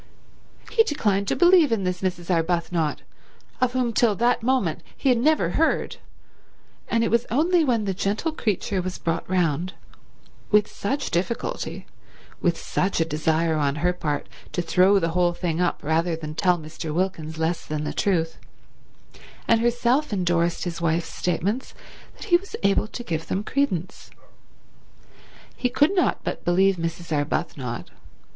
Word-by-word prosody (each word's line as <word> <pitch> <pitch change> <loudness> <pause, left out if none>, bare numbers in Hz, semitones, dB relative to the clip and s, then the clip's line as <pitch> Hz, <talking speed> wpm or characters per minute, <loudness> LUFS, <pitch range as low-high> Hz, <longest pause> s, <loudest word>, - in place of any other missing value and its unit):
He 450 - +5
declined 205 - 0
to - - +1
believe 350 -5 +5
in 220 -4 +1
this 180 0 -2
Mrs. 180 -1 -2
Arbuthnot, 165 -2 0 0.6
of 255 -1 +2
whom 250 -2 0
till 220 -2 +3
that 240 +3 +2
moment 230 -10 0 0.2
he 275 - +1
had 245 -2 +4
never 255 - +2
heard; 320 - +1 0.9
and 230 0 +1
it 230 - 0
was 235 +1 +2
only 330 +7 +3
when 235 -7 +1
the 195 - 0
gentle 205 - -1
creature 205 - -1
was 185 0 -4
brought 165 0 -2
round—with 185 +4 -2
such 275 +7 -3
difficulty, 185 +7 -2 0.6
with 170 -2 +1
such 190 -1 -1
a 165 - +3
desire 160 +1 +1
on 140 -2 +1
her 180 - +3
part 150 -4 -3 0.3
to 175 - -1
throw 185 +4 +4
the 165 -3 +1
whole 175 +1 +2
thing 170 -1 -2
up 175 - 0
rather 165 +3 +1
than 155 -1 -6
tell 180 +2 +2
Mr. 155 0 -7
Wilkins 160 -2 -2
less 160 +1 -1
than 150 0 -3
the - - -3
truth—and 190 +5 -3
herself 240 +4 +1
endorsed 175 -3 +1
his 170 -1 -4
wife's 165 0 0
statements 195 +8 -2 0.4
that - - -10
he 345 - +7
was 390 +3 -9
able 200 +2 +2
to 240 - -7
give 165 -6 -3
them 195 - -1
credence. 205 - -2 1.5
He 250 - 0
could 290 +8 +3
not 360 - +1
but - - -4
believe 190 +2 +3
Mrs. 165 -1 -3
Arbuthnot. 145 -4 -3
180 Hz, 150 wpm, -24 LUFS, 165-230 Hz, 1.5 s, he